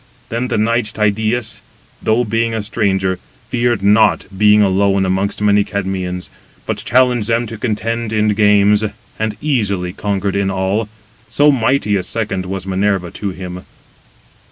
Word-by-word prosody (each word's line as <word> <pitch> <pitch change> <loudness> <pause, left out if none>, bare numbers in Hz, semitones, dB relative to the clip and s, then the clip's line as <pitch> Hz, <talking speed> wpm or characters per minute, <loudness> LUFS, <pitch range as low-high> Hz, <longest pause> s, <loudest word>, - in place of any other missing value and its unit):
Then 120 +2 -2
the 120 - -1
knight 110 0 0
Tydeus, 110 +2 -1 0.4
though 110 +3 +2
being 115 +1 0
a 110 - -2
stranger, 95 -3 0 0.3
feared 120 -4 0
not, 105 +1 +4
being 105 +1 +5
alone 100 0 +2
amongst 95 +2 -1
many 105 0 +4
Cadmeans: 95 -3 -4 0.3
but - - -2
challenged 125 -2 +2
them 115 +1 +1
to 115 - -7
contend 115 0 -2
[in 105 -1 +2
games], 105 0 +4 0.4
and 110 -1 -2
easily 100 -11 0
conquered 100 -1 -2
in 100 -1 +1
all, 95 +3 -1 0.4
so 145 +1 +4
mighty 130 -4 +1
a - - -1
second 95 -2 -3
was 95 0 -5
Minerva 95 -2 0
to 100 - -4
him. 90 -1 -7
105 Hz, 145 wpm, -17 LUFS, 95-115 Hz, 0.4 s, being